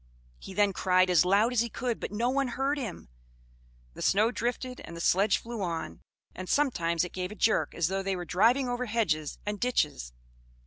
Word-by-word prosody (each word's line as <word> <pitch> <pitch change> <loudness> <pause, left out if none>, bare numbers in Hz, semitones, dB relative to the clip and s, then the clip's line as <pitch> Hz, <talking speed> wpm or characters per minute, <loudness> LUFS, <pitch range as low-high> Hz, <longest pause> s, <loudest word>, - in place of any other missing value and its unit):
He 190 - -10
then 205 -1 +3
cried 185 -1 +3
as 180 0 +5
loud 205 +6 +3
as 235 - +3
he 235 - -2
could, 240 +1 -3
but - - -5
no 235 +4 0
one 275 0 +1
heard 270 +4 -1
him; 215 - -6 0.9
the - - -10
snow 215 +4 +3
drifted 250 +1 -3
and 170 - -9
the - - -7
sledge 195 +4 +3
flew 235 -2 -7
on, 165 - -4 0.3
and 185 0 -8
sometimes 170 - +1
it 180 - -6
gave 180 +1 -4
a - - -8
jerk 215 0 +1
as 170 -2 +1
though 195 +2 -1
they 195 0 -1
were 175 -1 -5
driving 235 +10 +3
over 245 0 -2
hedges 170 -10 -1
and 205 0 -3
ditches. 150 - 0
205 Hz, 205 wpm, -29 LUFS, 180-240 Hz, 0.9 s, as